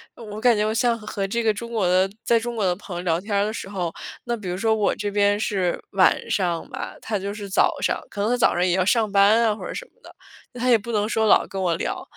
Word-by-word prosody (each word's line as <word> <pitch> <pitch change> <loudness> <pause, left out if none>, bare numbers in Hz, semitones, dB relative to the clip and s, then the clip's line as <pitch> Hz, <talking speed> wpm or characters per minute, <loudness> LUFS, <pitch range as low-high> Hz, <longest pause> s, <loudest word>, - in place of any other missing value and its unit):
我 215 -2 -8
感 240 -2 +4
觉 210 - +1
我 215 - 0
像 235 0 +1
和 210 -2 -4
这 230 +4 -1
个 220 -1 +3
中 235 +3 -7
国 210 -6 0
的 185 +2 +3
在 230 -1 +3
中 240 +1 -5
国 215 -4 0
的 180 - +1
朋 185 -1 -9
友 175 - -5
聊 170 0 0
天 205 0 -3
儿 200 - +2
的 215 - -3
时 195 - -6
候， 180 -4 -3 0.3
那 240 -1 -2
比 205 -5 -7
如 180 - -3
说 220 +2 +2
我 215 -2 +1
这 205 0 -3
边 205 0 +2
是 190 -5 -1
晚 190 -2 +4
上 175 -4 -1
吧， - - -6
他 210 -2 -2
就 200 +1 -4
是 205 -1 -7
早 195 - +2
上。 - - 0
可 - - -9
能 210 +4 +1
他 - - +3
早 - - +3
上 175 +1 +2
也 180 - +1
要 185 - +2
上 220 +2 +2
班 205 +3 +5
啊 215 -2 +2
或 205 - -10
者 - - -6
什 - - -6
么 - - -35
的， - - -15 0.4
那 245 - -9
他 250 - -1
也 240 - +7
不 230 +2 -7
能 210 -1 0
说 220 -1 +1
老 - - +5
跟 195 - -5
我 175 -3 +1
聊， - - -3
205 Hz, 315 characters per minute, -23 LUFS, 190-225 Hz, 0.4 s, 也